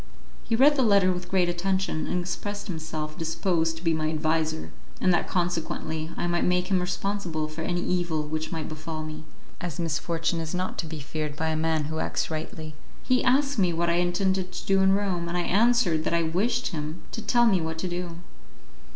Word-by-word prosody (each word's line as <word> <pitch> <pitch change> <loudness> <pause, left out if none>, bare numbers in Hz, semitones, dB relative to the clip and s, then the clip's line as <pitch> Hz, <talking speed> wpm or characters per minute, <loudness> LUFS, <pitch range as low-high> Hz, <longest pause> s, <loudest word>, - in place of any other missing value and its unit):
He 230 - 0
read 290 +5 +6
the - - +4
letter 200 -5 +5
with 180 0 -6
great 185 -2 +3
attention, 185 -1 0
and 180 - 0
expressed 205 +3 -4
himself 160 -4 -4
disposed 165 0 0
to 165 - -11
be 165 -1 +3
my 155 -1 0
adviser; 155 - 0 0.3
and 185 - +4
that 175 - +1
consequently 165 -3 -1
I - - -1
might 175 0 +1
make 180 +2 +1
him 190 - +4
responsible 180 -3 -2
for 155 +1 -7
any 175 +1 -1
evil 175 -4 0
which 155 +2 -3
might 160 -3 -3
befall 155 0 -5
me, 155 0 -7 0.4
as 175 -4 -4
misfortune 165 +1 0
is 160 +2 -3
not 185 +1 -2
to 165 - -2
be 155 -1 -6
feared 150 +1 -4
by 160 +1 -1
a 160 - 0
man 160 -1 +1
who 160 +2 -3
acts - - -1
rightly. 155 0 -5 0.3
He 255 0 +2
asked 275 0 +3
me 180 -3 +3
what 170 +1 +1
I 170 - +2
intended 185 +1 +1
to - - -6
do 195 0 +3
in 190 0 +5
Rome, 190 -4 0
and 175 - -1
I - - +2
answered 205 -5 +3
that - - +1
I 170 - +3
wished 210 +10 +1
him 155 0 -5
to 225 - -4
tell 240 +3 +4
me 195 -6 +4
what 160 0 -3
to 185 - -2
do. 175 -1 -4
175 Hz, 210 wpm, -27 LUFS, 160-190 Hz, 0.4 s, read